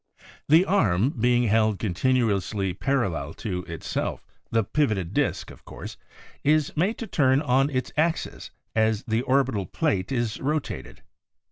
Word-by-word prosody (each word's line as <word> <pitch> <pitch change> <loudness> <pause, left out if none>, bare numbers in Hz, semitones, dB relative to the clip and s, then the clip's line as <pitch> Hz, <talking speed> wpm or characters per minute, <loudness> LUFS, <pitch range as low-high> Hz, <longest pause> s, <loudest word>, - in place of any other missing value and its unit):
The 165 +5 +6
arm 115 - +2
being 120 -1 +2
held 110 -2 +2
continu 110 +3 +1
ously 95 0 -2
parallel 95 - -1
to 90 -5 -4
itself, 85 -3 -4 0.2
the 115 -1 +2
pivoted 100 - 0
disk, - - -1
of - - -15
course, - - -9 0.5
is 155 0 +2
made 185 +8 +1
to 230 - -5
turn 135 -8 +3
on 135 -1 +2
its 130 -3 -2
axis 160 +2 -1 0.3
as 110 0 +2
the 115 -1 0
orbital 130 -7 +1
plate 120 - -1
is 120 -4 -1
rotated. 150 +1 -3
120 Hz, 140 wpm, -25 LUFS, 100-140 Hz, 0.5 s, The